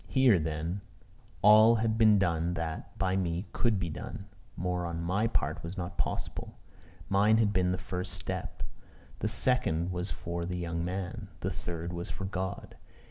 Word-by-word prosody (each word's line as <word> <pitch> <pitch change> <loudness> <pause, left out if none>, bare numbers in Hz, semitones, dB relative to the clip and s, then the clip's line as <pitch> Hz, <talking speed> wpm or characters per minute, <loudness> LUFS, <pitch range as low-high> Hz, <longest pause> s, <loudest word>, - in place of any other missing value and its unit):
Here, 130 -8 +5
then, 80 +4 -2 0.6
all 110 +3 +8
had 110 0 +1
been 110 -2 +6
done 85 -2 +1
that, 80 -1 -5
by 95 -1 +1
me, 90 0 -1
could 115 -4 +2
be 85 -3 -2
done: 95 +5 -6 0.3
more 90 0 -1
on 85 0 -3
my 95 +6 +1
part 80 -7 -1
was 85 +4 -6
not 85 -3 -5
possible. - - -3 0.5
Mine 105 +3 +4
had 105 -2 +3
been 90 -1 +2
the 90 - 0
first 90 +1 -4
step: 95 -1 -4 0.6
the 105 - 0
second 110 -7 +1
was 90 +2 -2
for 85 0 -4
the 90 +1 -3
young 85 -1 -2
man: 90 0 -4
the - - -1
third 85 0 -4
was 85 0 -4
for 95 - -4
God. 95 -1 -4
90 Hz, 170 wpm, -30 LUFS, 85-100 Hz, 0.6 s, all